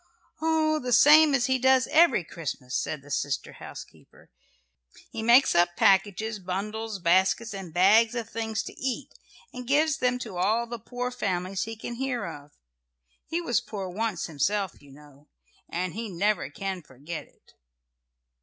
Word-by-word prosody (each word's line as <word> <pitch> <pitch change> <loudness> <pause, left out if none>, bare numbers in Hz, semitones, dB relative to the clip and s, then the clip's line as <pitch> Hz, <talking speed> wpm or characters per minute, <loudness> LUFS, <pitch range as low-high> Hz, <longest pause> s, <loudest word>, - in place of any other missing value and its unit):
"Oh, 315 -1 +2
the 250 -2 -2
same 295 +4 +7
as 245 -2 +1
he 260 -1 +1
does 260 0 +4
every 330 - +5
Christmas," 140 -6 -6
said 150 -3 -2
the 145 - -13
sister 140 -1 -2
housekeeper. - - -13 0.8
"He - - -5
makes 240 +4 +5
up 175 0 +3
packages, 205 +1 +2
bundles, 210 +4 -4
baskets 190 +5 +2
and 190 -4 -7
bags 215 +7 +4
of 230 -3 -3
things 220 -2 -3
to - - -8
eat, 260 -2 -4 0.4
and 250 -1 -8
gives 305 +3 +2
them 250 -4 +1
to 220 -7 -7
all 215 +6 +1
the 235 0 -7
poor 245 +3 -4
families 190 -5 -2
he 225 0 -6
can 235 - -6
hear 250 0 -3
of. 145 0 -9 0.8
He 335 +2 -2
was 240 -9 0
poor 195 -3 -6
once 210 -1 -2
himself, 190 +5 -2
you 140 - -17
know, 145 0 -17 0.4
and 180 +1 -3
he 225 +1 -5
never 195 -3 0
can 190 +4 -5
forget 150 +3 -8
it." - - -28
215 Hz, 160 wpm, -27 LUFS, 180-245 Hz, 0.8 s, same